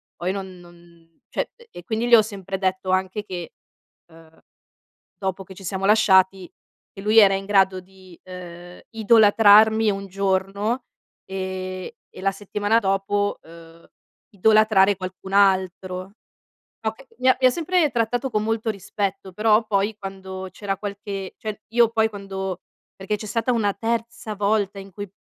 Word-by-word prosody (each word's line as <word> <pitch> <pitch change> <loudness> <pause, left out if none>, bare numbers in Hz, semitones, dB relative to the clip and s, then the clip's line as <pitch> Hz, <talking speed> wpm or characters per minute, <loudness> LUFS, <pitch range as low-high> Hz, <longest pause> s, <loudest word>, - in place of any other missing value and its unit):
poi 180 +2 -2
non 190 -2 -6
non 170 -1 -20
cioè - - -3
e 475 0 -19
e 175 - -11
quindi 225 +5 -2
gli 240 - +8
ho 220 - +7
sempre 195 -3 -6
detto 185 0 -1
anche 190 +3 -1
che, 175 -4 -6 0.6
ehm, 160 0 -19 0.8
dopo 190 -1 -3
che 190 +1 -12
ci 195 - -13
siamo 190 +1 -3
lasciati, 190 -3 +4 0.4
che - - -10
lui 215 +2 +3
era 195 -2 +7
in 195 - -3
grado 190 -2 +3
di, 185 -1 -18
ehm, 175 -1 -10
idolatrarmi 220 -1 +5
un 195 0 -4
giorno, 195 +5 -1 0.4
ehm, 185 -1 -5 0.2
e - - -12
la 195 - +2
settimana 205 +2 0
dopo, 200 0 0
ehm, 165 0 -15 0.5
idolatrare 215 -1 +4
qualcun 185 +1 -8
altro. 185 -1 +1 0.7
Oka 225 +4 -4
mi 255 +1 +3
ha 255 - +4
mi 260 - +2
ha - - +5
sempre 335 0 +1
trattato 245 +2 -1
con 215 0 0
molto 225 0 -1
rispetto, 195 -1 -4
però 215 +2 +3
poi 205 +1 0
quando 190 -1 -7
c'era 195 0 -4
qualche 200 -1 -6
cioè 215 -1 -6
io 235 -2 +5
poi 220 -1 +2
quando 190 -3 -5 0.4
perché 195 +2 -3
c'è 215 - -8
stata 230 +4 0
una 205 -4 +1
terza 230 0 -3
volta 205 -1 0
in 195 0 -11
cui 205 -1 -7
195 Hz, 155 wpm, -23 LUFS, 190-215 Hz, 0.8 s, gli